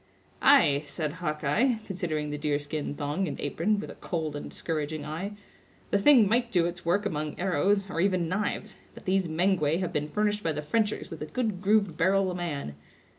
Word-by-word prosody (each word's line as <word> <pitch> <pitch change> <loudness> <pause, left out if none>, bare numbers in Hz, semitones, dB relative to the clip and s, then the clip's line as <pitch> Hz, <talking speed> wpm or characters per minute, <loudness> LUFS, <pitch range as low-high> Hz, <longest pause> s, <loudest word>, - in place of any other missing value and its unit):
"Ay!" 140 0 +6
said 150 +1 -3
Hawkeye, 155 - +1
considering 160 -6 -2
the 150 - -3
deer 150 -1 +1
skin 145 0 -4
thong 150 +6 -1
and 140 - -5
apron, 185 +9 0
with - - -6
a - - -15
cold 160 -4 -3
and 145 - -6
discouraging 155 -1 -3
eye; 170 +7 -4 0.6
"the 200 - +3
thing 240 -2 +7
might 235 +3 +1
do 175 -3 +3
its 175 0 -4
work 200 +5 +1
among 155 -5 -3
arrows, 195 +3 +2
or 170 -3 -2
even 185 -3 +2
knives; 205 +3 -2 0.2
but - - -12
these 190 -1 +2
Mengwe 165 -2 +2
have 185 -2 -2
been 150 0 -1
furnished 210 +3 0
by 165 -4 0
the 150 +1 -4
Frenchers 210 +3 -1
with 165 - -7
a 150 - -4
good 215 -2 -2
grooved 200 -4 +2
barrel 190 +2 +3
a - - -4
man. 150 - -4
175 Hz, 195 wpm, -28 LUFS, 150-200 Hz, 0.6 s, thing